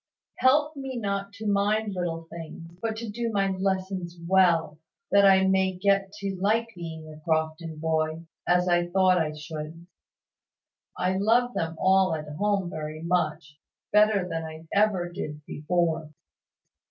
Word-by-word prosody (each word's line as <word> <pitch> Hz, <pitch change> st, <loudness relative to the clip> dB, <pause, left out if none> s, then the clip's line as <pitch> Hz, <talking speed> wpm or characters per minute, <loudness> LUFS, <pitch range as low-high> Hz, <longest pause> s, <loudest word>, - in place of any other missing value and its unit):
Help 295 Hz, +4 st, +3 dB
me 270 Hz, -2 st, -5 dB
not 200 Hz, -2 st, -2 dB
to 220 Hz, +1 st, -8 dB
mind 205 Hz, +1 st, +1 dB
little 170 Hz, -2 st, -3 dB
things; 165 Hz, 0 st, -9 dB
but 225 Hz, -1 st, -2 dB
to 230 Hz, +1 st, -5 dB
do 230 Hz, +2 st, -3 dB
my 195 Hz, -2 st, +1 dB
lessons 190 Hz, -2 st, -2 dB
well, 170 Hz, -4 st, +3 dB, 0.3 s
that 200 Hz, 0 st, +6 dB
I 190 Hz, 0 st, +6 dB
may 190 Hz, 0 st, +2 dB
get 195 Hz, 0 st, +2 dB
to 200 Hz, -2 st, -4 dB
like 225 Hz, +3 st, +2 dB
being 160 Hz, -2 st, -7 dB
a 155 Hz, 0 st, -11 dB
Crofton 160 Hz, 0 st, -2 dB
boy, 160 Hz, +1 st, -1 dB, 0.2 s
as 180 Hz, 0 st, +3 dB
I 175 Hz, -1 st, +2 dB
thought 185 Hz, 0 st, +3 dB
I 155 Hz, -2 st, -1 dB
should. 155 Hz, +2 st, -7 dB, 1.1 s
I 185 Hz, +1 st, 0 dB
love 240 Hz, +4 st, +3 dB
them 165 Hz, 0 st, -2 dB
all 190 Hz, -2 st, +3 dB
at 155 Hz, -1 st, -6 dB
home 200 Hz, -2 st, +1 dB
very 155 Hz, 0 st, -6 dB
much, 155 Hz, -4 st, -1 dB, 0.3 s
better 210 Hz, -3 st, +4 dB
than 165 Hz, -2 st, -3 dB
I 160 Hz, 0 st, -9 dB
ever 200 Hz, -4 st, +2 dB
did 150 Hz, -3 st, -7 dB
before. 160 Hz, 0 st, -1 dB
180 Hz, 150 wpm, -26 LUFS, 160-200 Hz, 1.1 s, that